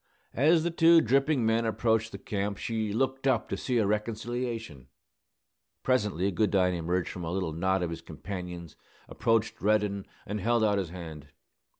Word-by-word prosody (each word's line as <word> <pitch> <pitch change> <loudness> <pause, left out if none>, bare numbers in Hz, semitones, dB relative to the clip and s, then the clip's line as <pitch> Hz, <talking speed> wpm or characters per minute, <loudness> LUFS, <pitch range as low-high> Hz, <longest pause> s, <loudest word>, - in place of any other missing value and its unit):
As 160 +5 +4
the 170 - 0
two 165 0 +6
dripping 135 0 +2
men 115 +1 +2
approached 110 0 +1
the 100 - -6
camp, 100 0 -3
she 110 -2 -2
looked 135 +4 -1
up 125 -5 +2
to - - -1
see 125 +5 -1
a 110 - +3
reconciliation. 110 - -3 1.0
Presently 105 -7 +1
Goodine 95 -1 +2
emerged 90 +1 -1
from 90 - -7
a 80 - -3
little 90 -4 -2
knot 95 +3 0
of 85 - -2
his 85 0 -6
companions, 85 0 -7 0.3
approached 115 -1 0
Reddin, 105 -1 +1 0.2
and 105 +1 -3
held 115 +2 +2
out 105 -2 +3
his 95 -4 -3
hand. 80 -4 -9
105 Hz, 165 wpm, -29 LUFS, 90-115 Hz, 1.0 s, two